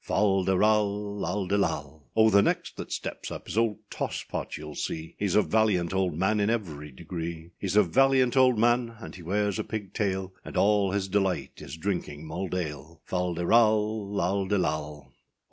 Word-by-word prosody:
Fal 95 -2 +2
de 95 0 +2
ral, 105 -2 +1
&c. 100 - +1 0.6
O! 110 0 +6
the 100 0 +6
next - - -1
that - - -7
steps - - -4
up - - -8
is - - -5
old 115 -1 +2
Toss - - -3
Pot, - - -5
youâll 75 0 -7
see, 80 0 -4
Heâs 100 -3 +1
a 105 - +6
valiant 100 -6 +1
old 95 -4 0
man, 95 +4 +2
in 100 +1 +2
every 80 -10 -3
degree, 85 +2 -6
Heâs 95 -1 -1
a 105 - +8
valiant 130 +6 +3
old 130 -3 +5
man, 120 +1 +2
and - - -9
he 90 - -10
wears 100 +3 0
a - - 0
pig 105 -3 -6
tail; 95 -3 -1
And - - -7
all 100 -1 +3
his 100 -1 -1
delight 95 -1 -1
is 80 - -8
drinking 80 -4 -3
mulled 90 +3 -4
ale. 80 -2 -5
Fal 90 -1 -1
de 85 +1 -2
ral, 105 -3 +2
&c. 105 - +2
O! 75 -5 -2
95 Hz, 185 wpm, -27 LUFS, 85-105 Hz, 0.6 s, a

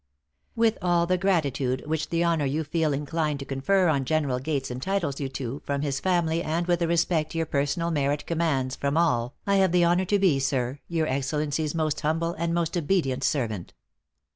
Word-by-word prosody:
With 225 -1 +2
all 175 -1 +2
the 185 +1 +1
gratitude 140 -9 0
which 155 0 -2
the 170 0 +1
honor 165 -4 +1
you 150 +4 -1
feel 155 +1 0
inclined 150 +1 -1
to 140 - -7
confer 175 +8 +1
on 140 -4 +2
General 140 -3 0
Gates 135 -1 -2
entitles 145 +2 -2
you 140 -2 -2
to 130 0 -5
from 140 0 -2
his 135 -2 -1
family, 170 -1 +1
and 165 +2 -1
with 175 -1 +1
the 170 - +1
respect 165 -2 +1
your 165 0 0
personal 145 +4 -1
merit 145 -1 0
commands 145 -6 0
from 140 +2 -1
all, 125 -7 +1
I 200 0 +3
have 190 -2 +3
the 180 0 +4
honor 175 +2 +3
to 205 +3 +2
be, 185 -8 +3
Sir, 135 0 -1
your 165 -2 0
Excellency's 150 +2 -1
most 155 -2 -1
humble 165 +2 0
and 170 0 0
most 170 0 -1
obedient 150 -6 0
servant. 115 - -2
155 Hz, 190 wpm, -26 LUFS, 140-170 Hz, -, the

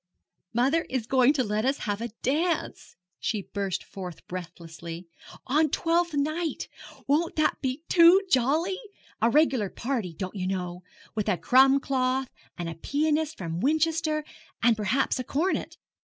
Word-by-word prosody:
'Mother 265 +8 +2
is 255 -4 -2
going 260 +2 +4
to 270 -4 +1
let 210 -1 -1
us 270 +3 +1
have 205 0 -2
a 235 - -2 0.2
dance,' 320 +5 -1 0.2
she 210 -4 -2
burst 195 -2 -3
forth 180 -4 -9
breathlessly, 170 -1 -8 0.4
'on 305 +4 +2
Twelfth 335 +2 +1
Night! 310 +3 -1 0.4
Won't 315 +4 +1
that 310 - +1
be 265 +2 -2
too 345 +2 +7
jolly? 320 +6 +1 0.4
A 230 - +4
regular 265 -7 +3
party, 230 -9 -3
don't 185 +4 -5
you 185 -2 -2
know, 180 -2 -3 0.3
with 215 -1 -1
a 185 - +2
crumb 265 +5 +5
cloth, 260 -1 0 0.3
and 175 - -4
a 165 - -4
pianiste 305 - 0
from 165 -2 -4
Winchester, 310 - +1 0.4
and 235 -1 +5
perhaps 225 +6 0
a - - -2
cornet. 320 +9 -1
260 Hz, 150 wpm, -27 LUFS, 200-305 Hz, 0.4 s, too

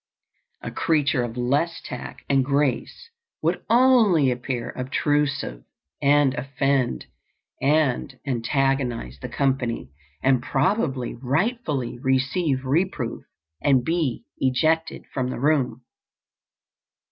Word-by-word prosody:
A - - -4
creature 150 -4 +1
of 120 0 -4
less 140 +7 0
tact 125 - -8
and 135 -1 +3
grace 140 - -1 0.3
would - - 0
only 225 - +5
appear 125 -1 -3
obtrusive 140 - -1 0.4
and 145 -1 +4
offend 135 - 0 0.6
and 140 -2 +1
antagonize 130 - -1
the - - -5
company, 125 - -1 0.3
and 130 -2 +3
probably 135 - 0
rightfully 140 - -1
receive 135 +2 0
reproof 145 -3 -1 0.4
and 130 -4 +3
be 160 -7 0 0.2
ejected 155 +5 +1
from 125 -1 -1
the - - -4
room. 130 -4 +1
135 Hz, 100 wpm, -24 LUFS, 125-150 Hz, 0.6 s, only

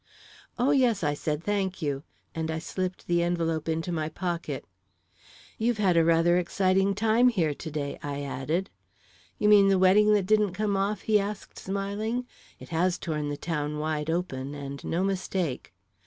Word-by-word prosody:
"Oh, 250 +3 +3
yes," 245 -8 +3
I 145 -1 +2
said; 150 +1 -3
"thank 195 -2 -1
you," 145 -4 -2 0.3
and 160 0 -3
I 160 - -1
slipped 185 +3 -4
the 175 0 +2
envelope 165 -2 -1
into 165 +2 -1
my 155 -2 -1
pocket. 175 0 -4 0.9
"You've 230 +1 +1
had 195 -4 +3
rather 165 +1 +4
an 180 - +4
exciting 190 +2 +1
time 225 +4 +4
here 170 -10 +1
to 160 - -7
day," 145 -2 -4
I 145 0 -4
added. 155 +7 -2 0.7
"You 210 - +1
mean 205 -2 +7
the 195 -1 +4
wedding 195 +3 +5
that 200 -3 +1
didn't 210 -2 +3
come 205 +1 0
off?" 200 +2 0
he 215 -1 +3
asked, 205 0 -5
smiling. 205 +5 -2 0.3
"It - - -11
has 175 +2 +1
torn 150 -3 -3
the 145 - -3
town 150 -2 -3
wide 155 0 -2
open, 145 -5 -2
and 140 -1 -7
no 175 +3 -1
mistake." 185 -6 -2
180 Hz, 170 wpm, -27 LUFS, 155-200 Hz, 0.9 s, mean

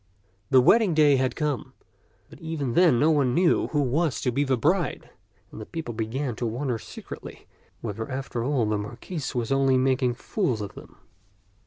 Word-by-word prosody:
The 130 - +6
wedding 200 - +4
day 150 -3 +5
had 130 0 0
come, 150 -5 -2 0.5
but - - -15
even 155 -6 -3
then 170 -7 +5
no 155 +2 +4
one 135 -5 +2
knew 175 -1 +3
who 145 -2 0
was 145 +3 0
to 125 - 0
be 140 +4 +1
the 135 -2 +1
bride; 170 +7 0 0.4
and - - -9
the - - -7
people 160 -8 -5
began 120 +3 -3
to 120 - -2
wonder 120 +1 -2
secretly - - -10 0.4
whether 110 +1 -5
after 130 -3 -4
all 130 -3 +1
the 105 -1 0
Mar 105 +3 -7
quis 155 -9 -5
was 120 +1 -2
only 135 -1 +3
making 130 -1 +1
fools 130 - -1
of 100 -2 -6
them. - - -13
130 Hz, 185 wpm, -25 LUFS, 120-150 Hz, 0.5 s, The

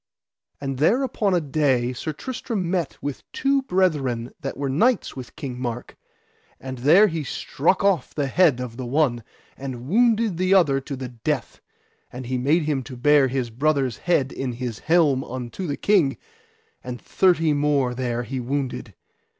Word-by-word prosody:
And 135 -2 -4
there 230 - +3
upon 205 -7 0
a - - +3
day 135 -5 +1
Sir 140 +5 -4
Tristram 210 - -4
met 175 -6 -1
with 145 -2 -4
two 275 0 +1
brethren 150 - 0
that - - -5
were 140 0 -2
knights 220 - +1
with 130 -3 -9
King 125 -3 -6
Mark, 120 -1 -5 0.6
and 130 -1 -7
there 160 - +6
he 165 -6 -2
struck 165 +6 0
off 195 -4 +1
the 145 - 0
head 145 -1 +3
of 125 -2 -6
the 130 - -5
one, 125 -3 +1 0.3
and 130 -2 -7
wounded 225 - +2
the 185 +2 +3
other 140 -8 +4
to 140 +1 -6
the 130 -1 -6
death; 125 +2 -3 0.5
and 125 +1 -7
he 125 +1 -2
made 150 +6 +2
him 145 -3 0
to 130 0 -9
bear 145 +2 +4
his 125 -2 -2
brother's 135 -1 0
head 145 -7 +1
in 130 -2 -4
his 120 -2 -5
helm 155 -5 +3
unto 130 +9 -6
the 145 - -3
king, 170 - +2 0.7
and 125 -1 -6
thirty 165 -5 +2
more 145 -3 +1
there 120 -1 -2
he 130 +3 -4
wounded. 130 +1 -3
140 Hz, 170 wpm, -23 LUFS, 125-170 Hz, 0.7 s, there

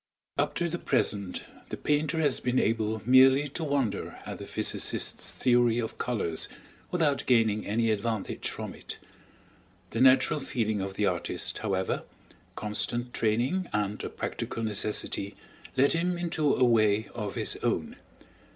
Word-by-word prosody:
Up - - 0
to 175 - 0
the 170 +1 -3
present 100 -3 0 0.3
the - - -4
painter 150 +2 0
has 145 -4 +3
been 125 +1 0
able 110 -1 +1
merely 130 +3 +6
to 160 - -3
wonder 140 -7 -1
at - - -6
the - - -8
physicist's - - 0
theory 120 -2 +3
of 115 -2 -3
colors, 105 -10 -1 0.4
without 155 -6 +1
gaining 110 -4 +3
any 110 +2 +1
advantage 110 0 -2
from - - -6
it. - - -8 0.9
The 115 - -1
natural 135 +3 +5
feeling 110 -7 -1
of 95 0 -4
the 105 - +1
artist, - - -1
however, 95 -3 -1 0.5
constant 120 +3 -3
training, 125 - 0
and 105 0 -1
a - - -3
practical 115 - -4
necessity 105 -1 -2 0.4
led 140 +2 +5
him 175 +2 0
into 165 -4 0
a 130 - +2
way 110 -3 +3
of 105 -4 -4
his - - -1
own. - - -1
120 Hz, 145 wpm, -28 LUFS, 105-140 Hz, 0.9 s, merely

